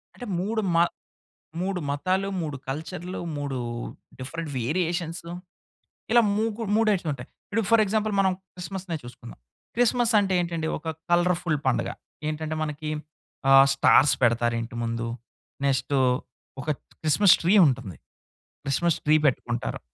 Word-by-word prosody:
అంటే, 245 - -8
3 220 +4 -1
మ - - +4 0.8
3 190 0 -1
మతాలు, 185 +7 0
3 150 -3 -4
కల్చర్‌లు, 170 +5 -5 0.2
3 140 -2 -3 0.6
డిఫరెంట్ 160 +4 -5
వేరియేషన్సు 170 +4 -2 0.8
ఇలా 235 0 +7 0.2
మూకు 225 0 -1
3 225 0 +3
టైప్స్ 195 -4 +1
ఉంటాయి. 130 -2 -6 0.2
ఇప్పుడు 225 - +1
ఫర్ 230 -1 +6
ఎగ్జాంపుల్ 215 +1 0
మనం 190 -1 +4 0.2
క్రిస్మస్‌నే 180 -1 -5
చూసుకుందాం. 120 -1 -11 0.4
క్రిస్మస్ 240 0 +2
అంటే 195 -2 0
ఏంటండి? 170 -2 -2
ఒక 160 +1 -10 0.2
కలర్‌ఫుల్ 175 -2 +2
పండగ. 120 -2 +1 0.4
ఏంటంటే 155 0 -3
మనకి 150 0 -4 0.6
ఆహ్, 135 0 +9
స్టార్స్ 135 +1 +5
పెడతారు 120 0 +3
ఇంటి 115 +1 -7
ముందు. 115 0 -2 0.6
నెక్స్టు 135 +1 +1 0.6
ఒక 145 - -5 0.3
క్రిస్మస్ 170 +5 +5
ట్రీ 180 - +4
ఉంటుంది 125 - -2 0.7
క్రిస్మస్ 155 +4 +1
ట్రీ 155 +1 +5
పెట్టుకుంటారు. 120 -3 -1
160 Hz, 125 wpm, -26 LUFS, 135-190 Hz, 0.8 s, ఆహ్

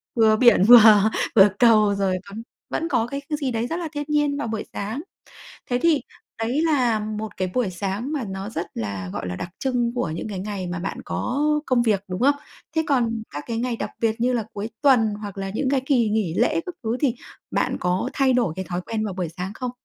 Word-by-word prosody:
vừa 220 -2 +5
biển 235 -4 +5
vừa 215 -2 +8 0.3
vừa 200 -1 +8
cầu 215 -4 +5
rồi 195 -2 0
còn 210 +3 -7 0.3
vẫn 330 - -2
có 240 -7 +1
cái 280 +3 -5
cái 300 - -1
gì 275 -4 -2
đấy 230 0 -1
rất 330 - -3
là 340 - -3
thiên 290 -1 -3
nhiên 295 -1 +1
vào 285 - -3
buổi 220 -1 -3
sáng. 220 +8 -4 0.7
Thế 245 - +2
thì 325 -4 +4 0.4
đấy 240 +7 0
là 255 -9 +2
một 215 0 -5
cái 185 -1 -2
buổi 245 -6 +1
sáng 200 - -3
mà 285 -6 -2
nó 195 +1 -5
rất 170 -6 -3
là, 100 -4 -4
gọi - - -4
là, 90 - -4
đặc 175 - -5
trưng 245 -3 0
của 245 -10 -1
những 165 +6 -5
cái 200 -3 -5
ngày 195 -1 -4
mà 175 0 -4
bạn 185 +3 -4
có, 250 - -3 0.2
ơ, - - 0
công 250 -2 +3
việc, 210 -4 +1
đúng 185 +2 -4
không? 280 +3 +4 0.4
Thế 320 - +3
còn 230 -5 +1
các 145 +1 -6
cái 230 -1 -3
ngày 240 0 -1
đặc - - -4
biệt 225 0 0
như 250 +2 +2
là 235 -3 0
cuối 210 +3 -5
tuần, 230 -7 +4
hoặc 205 -2 -7
là 195 0 -3
những 260 +4 0
cái 275 -1 +2
kỳ 245 -6 +3
nghỉ 210 -6 0
lễ 320 - +2
các 360 - -5
thứ 225 +1 -1
thì 270 -6 +2 0.4
bạn - - 0
có 180 +1 0
thay 270 -2 +2
đổi 240 -9 +1
cái 190 - -3
thói 175 0 -2
quen 215 +3 -3
vào 200 -3 -4
buổi 180 -2 -3
sáng 185 +2 -4
không? 250 +1 -4
225 Hz, 240 wpm, -23 LUFS, 195-255 Hz, 0.7 s, vừa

